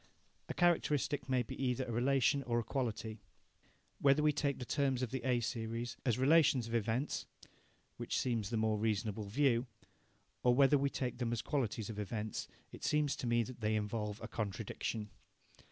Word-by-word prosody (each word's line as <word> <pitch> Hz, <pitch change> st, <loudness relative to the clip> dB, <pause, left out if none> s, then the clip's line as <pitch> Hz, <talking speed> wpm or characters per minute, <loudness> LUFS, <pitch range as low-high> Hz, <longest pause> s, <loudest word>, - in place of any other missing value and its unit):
A -, -, -3 dB
characteristic 150 Hz, -5 st, +1 dB
may 130 Hz, -1 st, +2 dB
be -, -, -7 dB
either 130 Hz, 0 st, 0 dB
a 120 Hz, -, -5 dB
relation 135 Hz, +3 st, +2 dB
or 120 Hz, -3 st, -1 dB
a 120 Hz, -, +1 dB
quality. 115 Hz, -3 st, -3 dB, 0.8 s
Whether 140 Hz, +2 st, +4 dB
we 150 Hz, 0 st, +4 dB
take 140 Hz, -1 st, 0 dB
the 125 Hz, -, -6 dB
terms 135 Hz, -2 st, +1 dB
of 120 Hz, -, -2 dB
the 130 Hz, -, -3 dB
A 125 Hz, -2 st, +2 dB
series 115 Hz, +1 st, -3 dB
as 115 Hz, -, +3 dB
relations 135 Hz, -2 st, +4 dB
of 115 Hz, -, -6 dB
events 115 Hz, +5 st, -1 dB, 0.7 s
(which -, -, -2 dB
seems 115 Hz, -5 st, 0 dB
the 115 Hz, -, -1 dB
more 110 Hz, -1 st, +1 dB
reasonable 105 Hz, -1 st, -1 dB
view) 120 Hz, +3 st, +2 dB, 0.7 s
or 125 Hz, -1 st, +4 dB
whether 140 Hz, +1 st, +5 dB
we 140 Hz, 0 st, +2 dB
take 125 Hz, -3 st, -3 dB
them 120 Hz, -2 st, -1 dB
as 120 Hz, -1 st, -2 dB
qualities 115 Hz, -6 st, -1 dB
of 105 Hz, -, -6 dB
events, 105 Hz, +1 st, -3 dB, 0.2 s
it -, -, -11 dB
seems 150 Hz, -1 st, +2 dB
to 130 Hz, -, -3 dB
me 120 Hz, 0 st, +3 dB
that 120 Hz, 0 st, -9 dB
they 110 Hz, 0 st, +1 dB
involve 105 Hz, 0 st, -2 dB
a -, -, -4 dB
contradiction. 105 Hz, 0 st, -4 dB
120 Hz, 180 wpm, -35 LUFS, 110-135 Hz, 0.8 s, whether